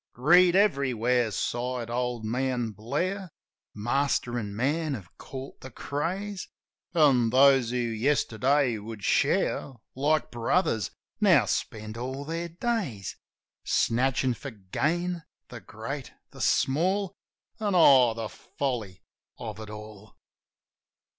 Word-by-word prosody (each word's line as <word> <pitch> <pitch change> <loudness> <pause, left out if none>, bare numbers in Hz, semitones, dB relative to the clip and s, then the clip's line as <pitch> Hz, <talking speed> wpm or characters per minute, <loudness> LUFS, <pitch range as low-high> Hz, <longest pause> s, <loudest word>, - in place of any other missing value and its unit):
"Greed 175 +7 +5
everywhere!" 125 - +2
sighed 120 +2 -2
old 120 -2 -2
man 125 0 -1
Blair. 170 - -3 0.5
"Master 120 +2 0
an' 100 -2 -5
man 145 +5 0
have 95 -7 -11
caught 135 0 -9
the 130 - -8
craze; 185 - -4 0.5
An' 135 -8 +5
those 135 -1 +5
who 125 - -1
yesterday 125 +1 +1
would 105 0 -8
share 135 - +1 0.2
Like 145 0 +1
brothers, 115 - +1 0.3
now - - +5
spend 110 +1 -3
all 130 +4 -4
their 165 +2 -3
days 170 - -3 0.5
Snatchin' 130 +1 +1
for 140 +4 -7
gain 160 - -2
— - - -60
the - - -8
great, - - -7 0.2
the - - -10
small. 185 +7 +1 0.5
And, 205 -3 0
oh, 130 -8 +6
the 115 -1 -3
folly 115 -9 -4 0.3
of 110 -3 -7
it 110 -1 -8
all 105 0 -11
130 Hz, 115 wpm, -27 LUFS, 115-150 Hz, 0.5 s, oh